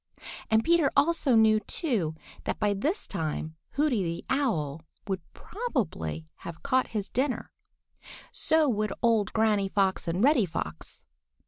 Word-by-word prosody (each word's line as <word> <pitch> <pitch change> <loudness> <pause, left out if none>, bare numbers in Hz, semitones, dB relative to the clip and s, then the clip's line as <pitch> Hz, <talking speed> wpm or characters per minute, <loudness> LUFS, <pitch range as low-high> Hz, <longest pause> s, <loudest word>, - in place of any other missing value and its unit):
And 220 0 +4
Peter 335 -3 +3
also 290 -3 +3
knew 220 -1 +5
too 210 - -1 0.3
that - - -1
by 205 -1 +1
this 300 - -1
time 160 -3 -3 0.2
Hooty 280 -7 +2
the 170 -1 -3
Owl 165 - 0 0.2
would 190 -3 -2
probably 160 - -3
have 170 -1 -9
caught 260 -2 +2
his 210 -3 -3
dinner. 260 0 -1 0.8
So 315 -1 +2
would 215 -4 0
old 225 -4 +3
Granny 215 -3 +2
Fox 190 -2 +1
and 175 +5 0
Reddy 260 -8 +4
Fox. 80 - -6
215 Hz, 135 wpm, -28 LUFS, 175-275 Hz, 0.8 s, knew